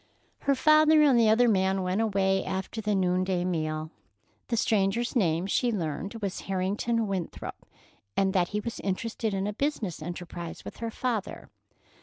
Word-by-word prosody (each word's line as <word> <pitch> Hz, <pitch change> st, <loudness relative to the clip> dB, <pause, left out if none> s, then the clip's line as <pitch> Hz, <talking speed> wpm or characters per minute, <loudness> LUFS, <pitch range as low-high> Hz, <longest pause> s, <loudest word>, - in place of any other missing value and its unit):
Her 280 Hz, -, +1 dB
father 310 Hz, +2 st, +6 dB
and 270 Hz, -5 st, +5 dB
the 225 Hz, -2 st, +5 dB
other 240 Hz, +3 st, +5 dB
man 190 Hz, -2 st, +2 dB
went 185 Hz, +4 st, 0 dB
away 195 Hz, -3 st, +1 dB
after 190 Hz, +4 st, -4 dB
the 210 Hz, -1 st, 0 dB
noonday 185 Hz, -1 st, +1 dB
meal. 155 Hz, -3 st, -2 dB, 0.6 s
The 235 Hz, -, -1 dB
stranger's 220 Hz, +3 st, +1 dB
name, 170 Hz, -6 st, +2 dB
she 240 Hz, +5 st, +1 dB
learned, 180 Hz, +1 st, -3 dB
was 195 Hz, -2 st, -2 dB
Harrington 205 Hz, +5 st, 0 dB
Winthrop, 190 Hz, -4 st, -5 dB, 0.5 s
and 190 Hz, -1 st, +2 dB
that 180 Hz, -2 st, +2 dB
he 210 Hz, -, -2 dB
was 230 Hz, +2 st, -5 dB
interested 220 Hz, +3 st, -2 dB
in 195 Hz, 0 st, -1 dB
a 210 Hz, -, -2 dB
business 230 Hz, -, -2 dB
enterprise 175 Hz, 0 st, -7 dB
with -, -, -8 dB
her 230 Hz, -, -3 dB
father. 225 Hz, -3 st, -3 dB
195 Hz, 160 wpm, -28 LUFS, 185-230 Hz, 0.6 s, father